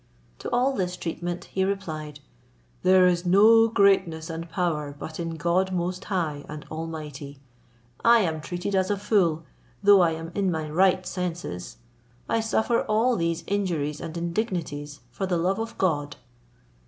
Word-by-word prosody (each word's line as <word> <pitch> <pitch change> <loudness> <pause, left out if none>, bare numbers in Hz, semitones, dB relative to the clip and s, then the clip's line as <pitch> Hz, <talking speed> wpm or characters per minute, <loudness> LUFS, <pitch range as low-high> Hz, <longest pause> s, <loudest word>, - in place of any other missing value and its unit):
To - - -5
all 255 +3 +2
this 180 -6 -2
treatment 175 +1 -4
he 190 - -1
replied, 155 -7 -4 0.6
"There 185 0 +5
is 175 -1 +2
no 215 +5 +6
greatness 190 -7 +2
and 165 +1 -6
power 160 -5 -2
but 155 +3 -7
in 165 -1 -3
God 175 +3 +1
most 180 +1 -2
high 160 -7 -2
and 150 0 -7
almighty. 150 -3 -6 0.6
I 235 0 +6
am 160 -5 -1
treated 175 +5 -4
as 190 -1 +2
a 205 - +1
fool, 190 -6 +1 0.4
though 200 -1 +7
I 170 -2 +3
am 165 +1 -6
in 195 -2 0
my 160 -3 -2
right 185 +3 +2
senses. 170 - -5 0.5
I 230 - +1
suffer 225 +1 +1
all 225 +4 +2
these 170 -2 -1
injuries 170 -8 -1
and 165 0 -6
indignities 170 - -3
for 190 +10 -3
the 180 -2 +1
love 185 +5 0
of 225 0 -5
God." 145 -6 0
175 Hz, 155 wpm, -25 LUFS, 160-195 Hz, 0.6 s, though